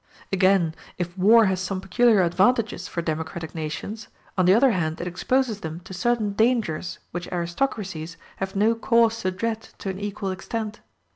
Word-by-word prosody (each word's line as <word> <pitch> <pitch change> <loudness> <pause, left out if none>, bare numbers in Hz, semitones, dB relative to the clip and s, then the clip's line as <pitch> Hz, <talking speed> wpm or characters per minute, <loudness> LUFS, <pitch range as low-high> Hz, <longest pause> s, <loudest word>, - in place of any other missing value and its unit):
Again, 185 -3 +3 0.2
if 175 0 -4
war 215 +4 +6
has 190 -1 0
some 190 0 -2
peculiar 195 +2 +4
advantages 190 +2 +2
for 170 - -3
democratic 160 0 -4
nations, 165 +7 -5 0.3
on 185 - +3
the 185 - +6
other 255 +3 +5
hand 160 -5 -1
it - - -3
exposes 220 +5 0
them 160 -1 -6
to 190 - -10
certain 215 +2 0
dangers 220 -7 +1
which 175 0 -5
aristocracies 175 -2 -2 0.2
have 190 0 -4
no 215 +3 +4
cause 230 -1 +2
to 185 - 0
dread 220 +4 -2 0.2
to 195 - -5
an 190 - -7
equal 205 -1 -3
extent. 210 +3 -4
190 Hz, 165 wpm, -24 LUFS, 175-225 Hz, 0.3 s, war